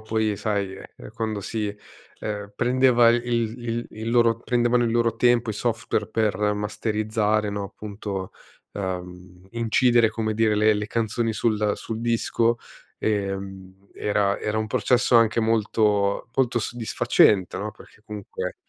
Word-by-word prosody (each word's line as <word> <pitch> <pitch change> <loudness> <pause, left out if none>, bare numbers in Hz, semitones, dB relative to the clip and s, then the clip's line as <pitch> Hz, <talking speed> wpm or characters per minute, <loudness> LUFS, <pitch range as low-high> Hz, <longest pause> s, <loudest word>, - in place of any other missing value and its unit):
poi, 110 0 0
ehm, - - -1
sai, 100 -3 -2
ehm, - - -10
eh, - - -11
quando 110 -2 -3
si, 105 -1 -3 0.5
ehm, 105 -1 -5
prendeva 125 -1 +4
il 120 0 +2
il 120 0 -2
il 110 +2 -5
loro 115 -1 +3
prendevano 120 0 +2
il 115 - 0
loro 115 -1 +1
tempo 120 -1 +2
i - - -2
software 115 +2 -2
per 110 -1 0 0.2
masterizzare, 105 0 -1
no, 100 0 -3
appunto, 100 -2 -6 0.4
ehm, 90 -1 -6
incidere 115 0 +3
come 110 0 -2
dire 110 -1 +2
le 110 +1 +4
le 105 0 -2
canzoni 115 0 -1
sul 105 -1 +1
sul 110 0 -5
disco, 115 0 +1 0.4
ehm, 95 -2 -4
era 100 -1 0
era 105 0 -2
un 110 - -1
processo 125 +3 +2
anche 115 0 +4
molto, 105 -2 +1
molto 125 -2 +2
soddisfacente 110 -5 +2
no. 105 +2 -3
Perché 105 - -18
comunque 105 -3 -6
110 Hz, 145 wpm, -24 LUFS, 105-115 Hz, 0.5 s, prendeva